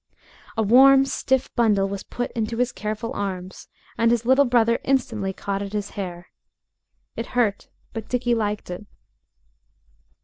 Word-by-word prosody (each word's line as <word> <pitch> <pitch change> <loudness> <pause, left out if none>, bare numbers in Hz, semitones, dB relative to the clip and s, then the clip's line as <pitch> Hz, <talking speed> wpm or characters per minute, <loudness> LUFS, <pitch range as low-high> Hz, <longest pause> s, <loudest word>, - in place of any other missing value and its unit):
A 220 - +2
warm, 270 +5 +7
stiff 265 -1 -1
bundle 210 -5 +3
was 195 0 -5
put 245 - -5
into 225 0 -3
his 250 0 +1
careful 215 +2 -4
arms, 190 -4 -5 0.3
and 230 0 +4
his 235 -1 +1
little 265 +3 +5
brother 235 -2 +3
instantly 235 -7 0
caught 195 +1 -4
at 200 0 -6
his 205 -1 -3
hair. 175 -3 -7 0.8
It 230 - -4
hurt, 210 -5 +1 0.2
but 225 -1 -6
Dickie 245 -1 +1
liked 210 -4 -2
it. 190 +4 -7
225 Hz, 145 wpm, -23 LUFS, 200-245 Hz, 0.8 s, warm